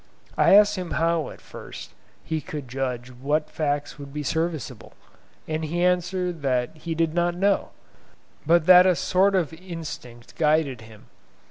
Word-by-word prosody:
I - - +5
asked 210 0 +5
him 180 -2 -4
how 165 0 +1
at - - -12
first - - -10 0.3
he 160 -1 -3
could 150 -7 -7
judge 125 -1 -4
what 145 +5 -2
facts 145 -2 -2
would 140 -1 -9
be 150 +1 -4
serviceable, 160 -1 -3 0.5
and 155 0 -2
he 170 +3 -1
answered 180 -1 0
that 125 0 -1
he 165 +1 -5
did 165 -1 0
not 175 0 +1
know, 195 +2 +1 0.7
but 165 +1 +3
that 180 0 +8
a 185 - +4
sort 195 +4 +2
of 170 -4 0
instinct 160 -9 -9
guided 150 -6 +1
him. 110 -1 -15
160 Hz, 155 wpm, -24 LUFS, 145-175 Hz, 0.7 s, that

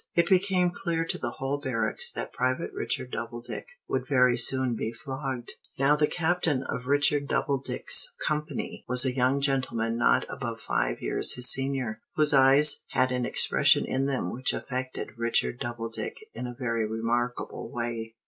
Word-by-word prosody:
It 170 - +3
became 185 -2 +2
clear 170 -3 -3
to - - -3
the 120 - -3
whole 135 +3 -4
barracks 115 -6 0
that - - -5
Private 130 0 -2
Richard 125 -1 -3
Doubledick 120 +1 -6 0.2
would - - -3
very 125 -3 +3
soon 130 +1 +3
be 110 - -4
flogged. 130 0 -6 0.3
Now 140 +2 +3
the 150 0 +1
Captain 160 -5 -1
of 125 -1 -6
Richard 145 0 +3
Doubledick's 475 - +2
company 150 -2 -4
was 125 +1 +5
a 130 - 0
young 130 +2 +1
gentleman 120 -4 -1
not - - +2
above - - -6
five - - -2
years - - +3
his 125 0 +6
senior, 135 -4 -2
whose 150 -1 +5
eyes 140 +2 +6
had 130 0 +2
an 125 -1 -2
expression - - +4
in 135 +1 -1
them 135 -2 -3
which 130 +2 0
affected 130 0 -5
Private 115 - -21
Richard 115 +1 +1
Doubledick 115 -1 -5 0.2
in 125 - -6
a 120 - -8
very 115 -4 -2
remarkable 120 +2 -3
way. 115 -1 -5
130 Hz, 165 wpm, -26 LUFS, 120-145 Hz, 0.3 s, his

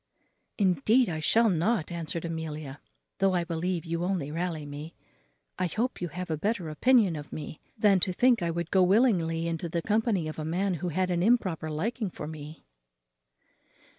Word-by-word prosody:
"Indeed 210 - +3
I 160 -2 -3
shall 225 +9 +4
not," 180 -1 +1
answered 170 0 -3
Amelia, 155 -4 -5 0.4
"though 195 -1 +3
I 175 - +1
believe 170 +1 -2
you 170 +1 -2
only 175 -6 -1
rally 165 -2 -3
me; 145 +3 -8 0.6
I 185 - +1
hope 230 +8 -2
you 175 - -1
have 180 +1 -6
a 155 - 0
better 195 -1 -1
opinion 210 - +3
of 145 -1 -8
me 150 0 -7 0.2
than 205 -3 +4
to 185 - +1
think 245 +3 +3
I 170 - 0
would 170 0 -3
go 190 - +4
willingly 180 -5 +3
into 165 0 -3
the 170 0 -2
company 215 -6 +1
of 155 - -6
a - - -3
man 180 +5 0
who 180 - -1
had 180 +3 0
an 175 -1 +1
improper 185 -7 +1
liking 210 +8 -2
for 155 - -7
me." 155 0 -9
175 Hz, 180 wpm, -28 LUFS, 160-195 Hz, 0.6 s, shall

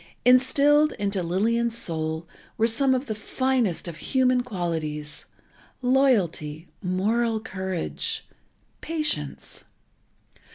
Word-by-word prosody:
Instilled 285 +4 +5
into 200 -1 -1
Lillian's 225 +7 +1
soul 160 -4 -1 0.3
were 220 - +3
some 260 +4 +3
of 255 +2 -2
the 225 - -3
finest 235 -3 -1
of 165 -2 -6
human 255 +4 +2
qualities: 160 -9 -4 0.6
loyalty, 190 - +2
moral 220 +5 +1
courage, 190 -4 -3 0.6
patience. 300 - -2
220 Hz, 90 wpm, -25 LUFS, 170-255 Hz, 0.6 s, Instilled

